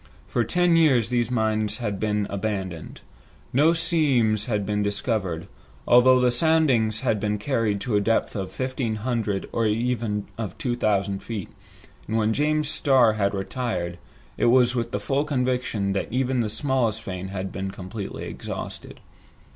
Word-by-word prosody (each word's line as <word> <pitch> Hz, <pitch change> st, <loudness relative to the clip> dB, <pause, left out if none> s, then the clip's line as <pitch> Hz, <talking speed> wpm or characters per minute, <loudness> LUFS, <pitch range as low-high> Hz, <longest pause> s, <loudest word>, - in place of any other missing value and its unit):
For -, -, 0 dB
ten 175 Hz, -1 st, +2 dB
years 140 Hz, -9 st, +4 dB
these 120 Hz, -2 st, +1 dB
mines 110 Hz, -3 st, 0 dB
had 105 Hz, -6 st, -3 dB
been 105 Hz, -1 st, 0 dB
abandoned. 95 Hz, -5 st, -4 dB, 0.5 s
No 145 Hz, +5 st, +5 dB
new 165 Hz, -, +5 dB
seams 130 Hz, -, +2 dB
had 105 Hz, -4 st, -1 dB
been 105 Hz, 0 st, 0 dB
discovered, 100 Hz, -4 st, -2 dB, 0.4 s
although 125 Hz, +1 st, +6 dB
the 125 Hz, -1 st, +3 dB
soundings 120 Hz, -7 st, +2 dB
had 115 Hz, -5 st, +1 dB
been 105 Hz, +1 st, -1 dB
carried 110 Hz, -3 st, 0 dB
to 120 Hz, -4 st, -1 dB
a 105 Hz, -, +3 dB
depth 115 Hz, +2 st, 0 dB
of 95 Hz, -3 st, -4 dB
fifteen 130 Hz, -1 st, -2 dB
hundred 110 Hz, -3 st, -2 dB
or 115 Hz, -1 st, +1 dB
even 110 Hz, -2 st, -1 dB
of 110 Hz, -3 st, -4 dB
two 120 Hz, -2 st, -1 dB
thousand 100 Hz, -4 st, 0 dB
feet, 110 Hz, -5 st, -5 dB, 0.6 s
and 110 Hz, -, 0 dB
when 110 Hz, 0 st, +2 dB
James 150 Hz, +3 st, +1 dB
Starr 130 Hz, -6 st, +4 dB
had 100 Hz, -1 st, 0 dB
retired, 95 Hz, -5 st, -3 dB, 0.4 s
it -, -, +2 dB
was 125 Hz, 0 st, +5 dB
with 120 Hz, -2 st, -1 dB
the 105 Hz, -, -1 dB
full 135 Hz, +7 st, 0 dB
conviction 125 Hz, -8 st, -1 dB
that 95 Hz, -, -2 dB
even 130 Hz, +1 st, 0 dB
the 110 Hz, -2 st, 0 dB
smallest 130 Hz, -2 st, 0 dB
vein 95 Hz, 0 st, -5 dB
had 95 Hz, 0 st, -4 dB
been 95 Hz, 0 st, -4 dB
completely 95 Hz, +2 st, -6 dB
exhausted. -, -, -7 dB
110 Hz, 165 wpm, -24 LUFS, 100-125 Hz, 0.6 s, although